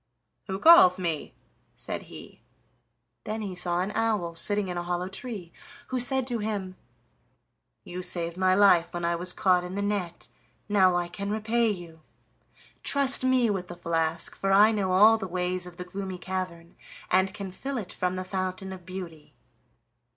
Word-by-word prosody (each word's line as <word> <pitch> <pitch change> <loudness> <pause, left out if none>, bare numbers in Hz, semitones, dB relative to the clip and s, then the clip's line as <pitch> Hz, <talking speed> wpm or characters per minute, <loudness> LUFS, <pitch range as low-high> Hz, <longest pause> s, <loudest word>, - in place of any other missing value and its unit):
"Who 190 -1 -3
calls 195 - +7
me?" 170 -5 -3 0.4
said - - -5
he; - - -12 0.8
then 215 +1 -4
he 195 -3 -5
saw 180 -1 0
an 190 +3 -2
owl 210 -6 -1
sitting 205 +4 +3
in 180 - -4
a 175 - -2
hollow 175 +1 -2
tree, 195 -4 -7 0.4
who 255 - -1
said 260 +1 +2
to 240 -2 -2
him: 205 -3 -4 1.1
"You 180 +1 -6
saved 170 -2 -2
my 185 0 +2
life 175 -4 +4
when 175 0 -2
I 170 0 +1
was 180 +2 -2
caught 180 -1 +2
in 180 +1 -6
the 200 - -2
net, 200 -4 -3 0.4
now 190 -3 +4
I 175 0 0
can 200 +3 -6
repay 220 +2 +1
you. 170 -5 -7 0.8
Trust 275 -2 +3
me 255 -3 +3
with 185 -3 -3
the 175 - -9
flask, 165 -1 -1
for 195 - -1
I 205 +3 +6
know 200 -4 -1
all 215 +4 +6
the 190 - -4
ways 180 0 -2
of 175 -1 -12
the 180 - -6
Gloomy 190 0 -6
Cavern, 180 -2 -6 0.3
and 190 +1 +3
can 200 -2 -7
fill 270 +8 -5
it 200 -6 -6
from 180 0 -2
the 185 - -3
Fountain 185 0 -4
of 180 -2 -12
Beauty." 175 -5 -9
185 Hz, 175 wpm, -27 LUFS, 175-205 Hz, 1.1 s, calls